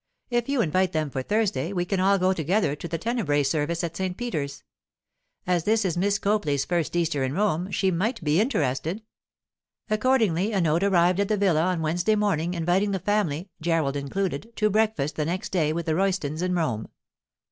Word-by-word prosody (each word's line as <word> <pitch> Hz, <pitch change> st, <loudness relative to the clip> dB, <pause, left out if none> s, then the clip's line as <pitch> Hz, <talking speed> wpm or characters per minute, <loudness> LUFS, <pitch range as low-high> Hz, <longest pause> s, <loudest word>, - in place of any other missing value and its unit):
If 240 Hz, +1 st, 0 dB
you 280 Hz, -3 st, +2 dB
invite 185 Hz, +3 st, +1 dB
them 155 Hz, -3 st, -1 dB
for 130 Hz, -, -2 dB
Thursday, 205 Hz, +1 st, 0 dB
we 175 Hz, -2 st, -1 dB
can 190 Hz, +1 st, -1 dB
all 195 Hz, +2 st, +4 dB
go 185 Hz, 0 st, +2 dB
together 170 Hz, -2 st, 0 dB
to 160 Hz, -, -7 dB
the 165 Hz, -, -3 dB
tenebræ 165 Hz, -, 0 dB
service 155 Hz, +4 st, -1 dB
at 170 Hz, -1 st, -3 dB
St. 185 Hz, 0 st, -3 dB
Peter's. 150 Hz, -13 st, -4 dB, 0.8 s
As 175 Hz, -2 st, +1 dB
this 220 Hz, +2 st, +2 dB
is 175 Hz, -, 0 dB
Miss 200 Hz, +3 st, +1 dB
Copley's 195 Hz, -10 st, 0 dB
first 175 Hz, -2 st, -1 dB
Easter 165 Hz, -5 st, 0 dB
in 130 Hz, 0 st, -1 dB
Rome, 185 Hz, -1 st, 0 dB
she 190 Hz, -1 st, +1 dB
might 210 Hz, +5 st, -1 dB
be 155 Hz, +5 st, +3 dB
interested.' 165 Hz, -, -1 dB, 0.9 s
Accordingly 215 Hz, -4 st, +2 dB
a 195 Hz, -, +1 dB
note 165 Hz, -1 st, +2 dB
arrived 180 Hz, -2 st, +3 dB
at 200 Hz, -, +2 dB
the 215 Hz, -, +1 dB
villa 175 Hz, -5 st, +2 dB
on 180 Hz, -3 st, 0 dB
Wednesday 175 Hz, +7 st, +1 dB
morning 180 Hz, -5 st, 0 dB
inviting 175 Hz, +5 st, +1 dB
the 195 Hz, -, 0 dB
family—Gerald 170 Hz, -6 st, -1 dB
included—to 195 Hz, +8 st, -2 dB
breakfast 210 Hz, -9 st, 0 dB
the 150 Hz, -, 0 dB
next 185 Hz, +6 st, -3 dB
day 160 Hz, -5 st, +1 dB
with 170 Hz, +2 st, -3 dB
the 160 Hz, -, 0 dB
Roystons 175 Hz, -4 st, 0 dB
in 180 Hz, 0 st, 0 dB
Rome. 125 Hz, -11 st, -1 dB
180 Hz, 185 wpm, -25 LUFS, 155-200 Hz, 0.9 s, all